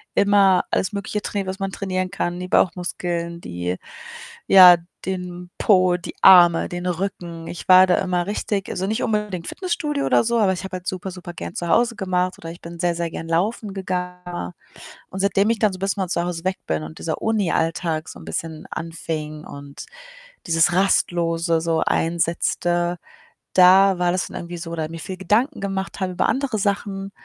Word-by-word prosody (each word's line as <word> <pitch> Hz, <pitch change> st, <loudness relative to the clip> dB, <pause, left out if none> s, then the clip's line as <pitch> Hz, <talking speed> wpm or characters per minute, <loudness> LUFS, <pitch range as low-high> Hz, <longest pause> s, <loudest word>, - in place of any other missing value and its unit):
immer 200 Hz, -2 st, +4 dB
alles 190 Hz, -, 0 dB
Mögliche 210 Hz, +1 st, -3 dB
trainiert, 200 Hz, -2 st, -3 dB
was 190 Hz, +1 st, -4 dB
man 195 Hz, 0 st, -2 dB
trainieren 185 Hz, -2 st, -2 dB
kann, 175 Hz, -2 st, -3 dB
die 180 Hz, -, -5 dB
Bauchmuskeln, 170 Hz, -1 st, -1 dB
die 90 Hz, +1 st, -4 dB, 0.7 s
ja, 180 Hz, -2 st, +9 dB, 0.3 s
den 180 Hz, -1 st, -5 dB
Po, 185 Hz, -3 st, +4 dB
die 175 Hz, -, -9 dB
Arme, 175 Hz, -3 st, +7 dB
den 175 Hz, 0 st, -5 dB
Rücken. 175 Hz, -2 st, -4 dB
Ich 170 Hz, -, -8 dB
war 185 Hz, 0 st, +8 dB
da 180 Hz, -, +3 dB
immer 180 Hz, -1 st, -1 dB
richtig 205 Hz, -1 st, -2 dB
also, 190 Hz, -, -3 dB
nicht 220 Hz, +4 st, -1 dB
unbedingt 210 Hz, -5 st, -2 dB
Fitnessstudio 310 Hz, -6 st, -2 dB
oder -, -, +3 dB
so, 235 Hz, 0 st, +1 dB
aber 195 Hz, -3 st, +3 dB
ich 185 Hz, +1 st, -5 dB
habe 190 Hz, -1 st, -5 dB
halt 180 Hz, -, -18 dB
super 185 Hz, 0 st, -4 dB
supergern 175 Hz, -1 st, -8 dB
zu 175 Hz, -, -4 dB
Hause 235 Hz, +3 st, +3 dB
gemacht 185 Hz, -1 st, -1 dB
oder 165 Hz, -, -8 dB
ich 170 Hz, -, -11 dB
bin 170 Hz, 0 st, -10 dB
sehr, 175 Hz, -1 st, +1 dB
sehr 170 Hz, -1 st, -2 dB
gern 165 Hz, -, -7 dB
laufen 200 Hz, +4 st, -1 dB
gegangen. 180 Hz, -, -4 dB, 0.6 s
Und 190 Hz, -, -7 dB
seitdem 200 Hz, +2 st, +2 dB
ich 230 Hz, -3 st, 0 dB
dann 215 Hz, -3 st, +3 dB
so 185 Hz, -, -8 dB
bisschen 195 Hz, 0 st, -1 dB
von 180 Hz, -, -2 dB
zu 170 Hz, -2 st, 0 dB
Hause 175 Hz, -1 st, -4 dB
weg 185 Hz, 0 st, -1 dB
bin 80 Hz, -1 st, -1 dB
und 80 Hz, 0 st, -9 dB
dieser 160 Hz, -, -3 dB
Unialltag 165 Hz, -6 st, 0 dB
so -, -, -10 dB
'n 80 Hz, -, -12 dB
bisschen 155 Hz, -, -5 dB
anfing 155 Hz, -2 st, -5 dB
und 140 Hz, 0 st, -10 dB, 0.6 s
dieses 165 Hz, +1 st, +3 dB
Rastlose 170 Hz, -3 st, +1 dB
so 165 Hz, -1 st, 0 dB
einsetzte, 175 Hz, +1 st, 0 dB, 0.6 s
da 190 Hz, +1 st, +6 dB
war 175 Hz, 0 st, +2 dB
das 180 Hz, 0 st, -1 dB
dann -, -, -11 dB
irgendwie 175 Hz, 0 st, -7 dB
so 165 Hz, 0 st, -7 dB
oder 160 Hz, -2 st, -3 dB
mir 165 Hz, 0 st, -7 dB
viel 185 Hz, +4 st, -6 dB
Gedanken 225 Hz, -, +1 dB
gemacht 195 Hz, 0 st, -4 dB
habe 185 Hz, -1 st, -2 dB
über -, -, +1 dB
andere 260 Hz, -5 st, -1 dB
Sachen, 195 Hz, 0 st, -2 dB
180 Hz, 185 wpm, -22 LUFS, 170-195 Hz, 0.7 s, ja